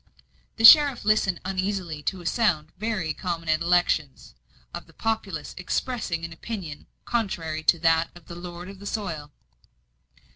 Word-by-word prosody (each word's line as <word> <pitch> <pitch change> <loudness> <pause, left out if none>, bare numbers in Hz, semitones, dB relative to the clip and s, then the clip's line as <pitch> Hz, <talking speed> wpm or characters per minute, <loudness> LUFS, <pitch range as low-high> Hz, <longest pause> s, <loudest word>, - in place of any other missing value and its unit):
The 225 - +3
sheriff 285 -2 +8
listened 210 -4 +2
uneasily 185 -4 -3
to 185 +4 -3
a - - -13
sound, 165 -7 +1
very 215 -6 -2
uncommon 165 0 -4
at 155 +1 +2
elections, 170 -5 0 0.4
of - - -7
the - - -20
populace 200 -9 -3
expressing 180 -4 -2
an 165 - -8
opinion 165 -5 -7 0.2
contrary 165 -9 -2
to 170 - +5
that 165 0 +2
of 175 - -15
the - - -9
lord 175 0 -8
of 195 0 -11
the 200 - -8
soil. 165 -10 -4
175 Hz, 150 wpm, -25 LUFS, 165-205 Hz, 0.4 s, sheriff